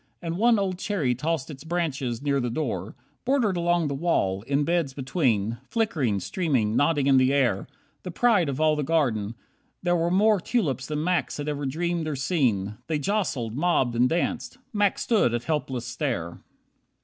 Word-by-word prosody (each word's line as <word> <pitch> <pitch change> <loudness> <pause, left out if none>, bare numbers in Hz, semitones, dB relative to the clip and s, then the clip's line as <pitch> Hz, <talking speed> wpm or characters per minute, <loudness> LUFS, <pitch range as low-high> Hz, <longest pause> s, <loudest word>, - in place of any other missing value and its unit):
And 170 0 -4
one 235 0 +5
Old 190 -3 -1
cherry 175 -12 0
tossed 155 +3 -2
its 140 -1 -10
branches 140 -8 -2
near 140 -1 +1
the 125 -2 -1
door. 150 +7 -3 0.3
Bordered 250 -8 +2
along 175 -1 +1
the 140 - -2
wall, 135 - 0
in 140 +1 +2
beds 165 -4 0
between, 120 - 0
Flickering, 150 - 0
streaming, 120 - 0
nodding 145 0 +2
in 135 -1 +5
the 130 +1 +4
air, 125 -9 +1 0.3
The - - -6
pride 190 -3 +3
of 135 0 -3
all 155 -1 +3
the 150 - -1
garden, 120 -9 0 0.5
there 175 0 +2
were 170 0 +1
more 205 +3 +4
Tulips 150 - -1
than 150 0 -2
Max 180 +1 0
had 145 0 -4
ever 145 -2 -2
dreamed 170 +3 -1
or 155 - -2
seen. 120 - 0
They 155 -1 0
jostled, 150 - -1
mobbed, 145 -6 +1
and 125 +2 +3
danced. 235 +9 -2 0.2
Max 205 -2 +1
stood 205 - +2
at 120 - -3
helpless 135 -6 -2
stare. 120 - -3
150 Hz, 175 wpm, -26 LUFS, 130-175 Hz, 0.5 s, one